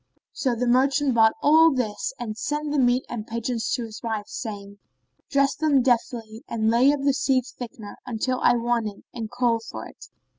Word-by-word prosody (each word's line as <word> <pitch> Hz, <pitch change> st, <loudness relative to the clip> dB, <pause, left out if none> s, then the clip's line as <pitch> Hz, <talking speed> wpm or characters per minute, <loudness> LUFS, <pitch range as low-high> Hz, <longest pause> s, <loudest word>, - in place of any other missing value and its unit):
So 255 Hz, -4 st, -1 dB
the 245 Hz, +2 st, -1 dB
merchant 270 Hz, +3 st, +3 dB
bought 220 Hz, -1 st, +5 dB
all 320 Hz, +2 st, +6 dB
this 240 Hz, -6 st, -2 dB
and 225 Hz, -3 st, -5 dB
sent 295 Hz, +6 st, -3 dB
the 295 Hz, -, +1 dB
meat 250 Hz, 0 st, +2 dB
and 220 Hz, -3 st, -6 dB
pigeons 230 Hz, 0 st, -3 dB
to 245 Hz, -, -3 dB
his 220 Hz, -1 st, -9 dB
wife, 220 Hz, -3 st, -3 dB
saying, 205 Hz, -4 st, -7 dB, 0.5 s
"Dress 275 Hz, 0 st, +2 dB
them 290 Hz, -5 st, +2 dB
deftly 230 Hz, -3 st, -1 dB
and 220 Hz, -1 st, 0 dB
lay 250 Hz, +4 st, +5 dB
up 290 Hz, -1 st, -2 dB
the 280 Hz, -1 st, +3 dB
seed 265 Hz, -1 st, +1 dB
thickener 240 Hz, -5 st, -9 dB
until 250 Hz, +2 st, -2 dB
I -, -, +5 dB
want 235 Hz, -1 st, 0 dB
it 205 Hz, -1 st, -9 dB
and 225 Hz, -3 st, -5 dB
call 245 Hz, -1 st, +1 dB
for 225 Hz, -, -8 dB
it." -, -, -13 dB
240 Hz, 190 wpm, -24 LUFS, 225-265 Hz, 0.5 s, all